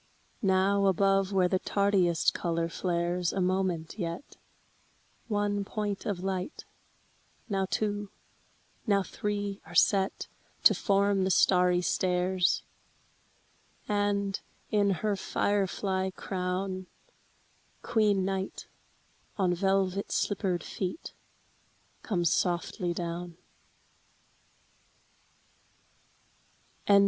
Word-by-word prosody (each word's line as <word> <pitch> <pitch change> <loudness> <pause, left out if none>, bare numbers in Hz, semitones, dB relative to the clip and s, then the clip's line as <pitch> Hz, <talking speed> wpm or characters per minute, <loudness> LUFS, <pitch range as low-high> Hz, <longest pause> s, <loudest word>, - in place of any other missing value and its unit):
Now 195 0 +3
above 195 +1 +3
where 190 -2 +3
the 185 +1 +1
tardiest 195 -5 +2
color 170 -1 -1
flares 175 0 -1
a - - -2
moment 185 -1 -1
yet, 170 +9 -5 0.9
One 205 -2 0
point 205 0 -3
of 190 -4 -2
light, 190 - -3 0.8
now 195 -3 0
two, 205 -1 -1 0.8
now 200 -2 +3
three 205 0 -3
are - - -12
set 195 0 +3 0.4
To - - +8
form 200 -1 +2
the 190 - +1
starry 180 -1 +4
stairs,— 180 +1 +1 1.2
And, 205 -1 0 0.3
in 205 -1 +3 0.2
her 210 -1 +2
fire 200 +1 0
fly 190 0 -1
crown, 185 0 -3 1.0
Queen 210 -5 +2
Night, 190 0 -3 0.7
on 185 -3 +2
velvet 195 +1 0
slippered 185 -4 0
feet, 190 - -5 0.9
comes 175 -6 +1
softly 175 +1 0
down. 170 0 -4
190 Hz, 90 wpm, -29 LUFS, 180-200 Hz, 1.2 s, To